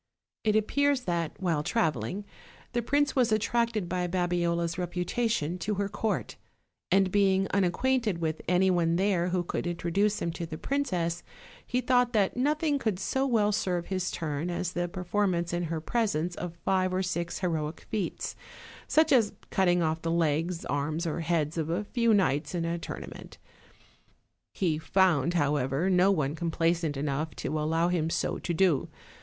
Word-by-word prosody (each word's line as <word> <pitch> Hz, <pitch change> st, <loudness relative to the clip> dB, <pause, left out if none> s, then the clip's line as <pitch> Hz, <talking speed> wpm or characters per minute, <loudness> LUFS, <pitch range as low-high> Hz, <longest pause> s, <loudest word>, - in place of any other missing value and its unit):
It 215 Hz, -1 st, +2 dB
appears 280 Hz, +5 st, +2 dB
that, 170 Hz, -7 st, -2 dB
while 170 Hz, -5 st, 0 dB
traveling, 160 Hz, -, -1 dB, 0.5 s
the 240 Hz, -, +1 dB
prince 285 Hz, +4 st, +1 dB
was 245 Hz, -4 st, +3 dB
at 215 Hz, -1 st, +3 dB
tracted 230 Hz, -4 st, 0 dB
by 180 Hz, 0 st, -1 dB
Babiola's 175 Hz, -1 st, 0 dB
reputation 180 Hz, 0 st, -1 dB
to 210 Hz, +3 st, -1 dB
her 200 Hz, 0 st, -1 dB
court, 215 Hz, +2 st, -2 dB, 0.5 s
and 190 Hz, 0 st, +3 dB
being 195 Hz, -1 st, +3 dB
unacquainted 210 Hz, +3 st, +1 dB
with 160 Hz, -2 st, -2 dB
any 185 Hz, +2 st, +3 dB
one 170 Hz, -2 st, +2 dB
there 185 Hz, -2 st, +2 dB
who 180 Hz, 0 st, 0 dB
could 175 Hz, -, -3 dB
introduce 185 Hz, +5 st, 0 dB
him 170 Hz, -, -1 dB
to 170 Hz, 0 st, -5 dB
the 155 Hz, -1 st, -6 dB
princess, 180 Hz, -, -1 dB, 0.4 s
he 250 Hz, 0 st, -1 dB
thought 245 Hz, 0 st, +2 dB
that 205 Hz, -3 st, +2 dB
nothing 295 Hz, +3 st, +1 dB
could 220 Hz, -7 st, -1 dB
so 265 Hz, +8 st, 0 dB
well 215 Hz, -5 st, +2 dB
serve 180 Hz, -4 st, -1 dB
his 185 Hz, -1 st, -1 dB
turn 155 Hz, +1 st, -3 dB
as 175 Hz, 0 st, -2 dB
the 175 Hz, 0 st, -1 dB
performance 180 Hz, -1 st, -1 dB
in 175 Hz, 0 st, -1 dB
her 165 Hz, 0 st, -2 dB
presence 180 Hz, -3 st, 0 dB
of 170 Hz, -1 st, -6 dB
five 185 Hz, -1 st, +2 dB
or 185 Hz, +1 st, 0 dB
six 175 Hz, -2 st, -2 dB
heroic 160 Hz, -3 st, -2 dB
feats, 210 Hz, -4 st, -3 dB, 0.5 s
such 315 Hz, +1 st, +3 dB
as 230 Hz, -6 st, +4 dB, 0.2 s
cutting 175 Hz, -2 st, +3 dB
off 160 Hz, 0 st, 0 dB
the 165 Hz, -, -2 dB
legs, 165 Hz, +1 st, 0 dB
arms 155 Hz, +4 st, -1 dB
or 165 Hz, 0 st, -2 dB
heads 165 Hz, -1 st, 0 dB
of 160 Hz, 0 st, -2 dB
a 175 Hz, +5 st, 0 dB
few 235 Hz, +2 st, +1 dB
knights 175 Hz, -6 st, +2 dB
in 170 Hz, -1 st, -1 dB
a 170 Hz, +1 st, -2 dB
tournament. -, -, -8 dB, 1.1 s
He 165 Hz, -5 st, 0 dB
found, 170 Hz, -2 st, +2 dB
however, 145 Hz, +2 st, +1 dB
no 185 Hz, +1 st, +5 dB
one 150 Hz, -7 st, +1 dB
complaisant 165 Hz, -2 st, 0 dB
enough 145 Hz, +2 st, -2 dB
to -, -, -4 dB
allow 165 Hz, +3 st, +1 dB
him 165 Hz, -3 st, 0 dB
so -, -, -1 dB
to -, -, -3 dB
do. 170 Hz, -4 st, +2 dB
180 Hz, 165 wpm, -28 LUFS, 165-205 Hz, 1.1 s, no